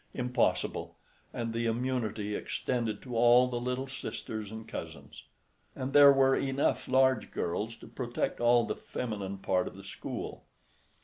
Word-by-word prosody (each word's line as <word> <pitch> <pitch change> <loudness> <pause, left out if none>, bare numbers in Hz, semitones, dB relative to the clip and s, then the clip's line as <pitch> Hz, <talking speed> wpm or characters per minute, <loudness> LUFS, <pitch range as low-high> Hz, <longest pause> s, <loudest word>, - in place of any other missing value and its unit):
Impossible—and 125 -2 -2
the 115 0 0
immunity 115 -3 -1
extended 115 -1 -2
to 125 -2 -6
all 120 +2 +6
the 120 -1 -2
little 125 +2 -2
sisters 110 -5 -6
and 110 0 -8
cousins; - - -8 0.5
and 130 +1 -4
there 145 -1 +9
were 135 -1 +4
enough 135 +1 0
large 130 -2 +3
girls 105 +6 -2
to - - -14
protect 120 -2 -3
all 120 0 +4
the - - -3
feminine 100 -5 -5
part 90 -1 0
of - - -8
the 100 - -10
school. 95 - -6
120 Hz, 140 wpm, -30 LUFS, 110-130 Hz, 0.5 s, there